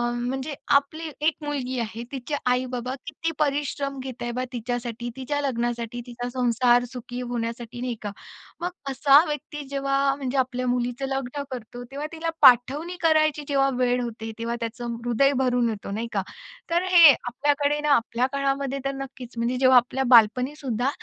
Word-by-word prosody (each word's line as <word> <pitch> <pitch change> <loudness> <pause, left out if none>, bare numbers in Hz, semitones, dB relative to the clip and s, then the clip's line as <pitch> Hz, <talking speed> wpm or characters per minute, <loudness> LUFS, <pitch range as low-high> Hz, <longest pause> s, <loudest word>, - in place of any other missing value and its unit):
म्हणजे 260 +4 -3 0.2
आपली 310 +3 0
एक 310 +1 +2
मुलगी 265 -3 -3
आहे 230 0 -4
तिचे 275 +2 -4 0.2
आई-बाबा 250 0 -1
किती 325 +2 -3
परिश्रम 280 -2 -1
घेत 255 -2 -7
आहे 240 0 -2
बा 255 - 0
तिच्यासाठी? 240 0 -4
तिच्या 270 +2 -2
लग्नासाठी, 240 -3 -2
तिचा 245 0 -5
संसार 245 0 +3
सुखी 245 0 -7
होण्यासाठी, 235 0 -4
नाही 250 -1 -2
का? 205 -1 -4 0.5
मग 355 - -1 0.2
असा 275 +2 +6
व्यक्ती 295 0 -5
जेव्हा 275 0 +1
म्हणजे 270 -1 -3
आपल्या 255 -1 0
मुलीचं 245 +1 -1
लग्न 270 +1 -3
करतो, 245 0 -7
तेव्हा 285 +2 -4
तिला 330 0 -3
पाठवणी 275 +8 +5
करायची 310 -2 +3
जेव्हा 275 -1 +2
वेळ 245 0 +2
होते, 225 -2 -5
तेव्हा 230 +1 -2
त्याचं 235 0 -4
हृदय 275 +4 +3
भरून 245 -2 +2
येतो, 205 -2 -5
नाही 225 +3 -3
का? 200 - +1 0.5
तर 340 +1 +2
हे 335 -5 +10
आपल्याकडे 285 +4 0
ना 300 0 +1
आपल्या 235 +1 0
काळामध्ये 275 0 -1
तर 275 - +1
नक्कीच 255 -3 -11
म्हणजे 235 +2 0
जेव्हा 255 0 +6
आपल्या 255 +2 +2
बालपणीसुद्धा, 250 +2 +3
255 Hz, 160 wpm, -25 LUFS, 240-280 Hz, 0.5 s, हे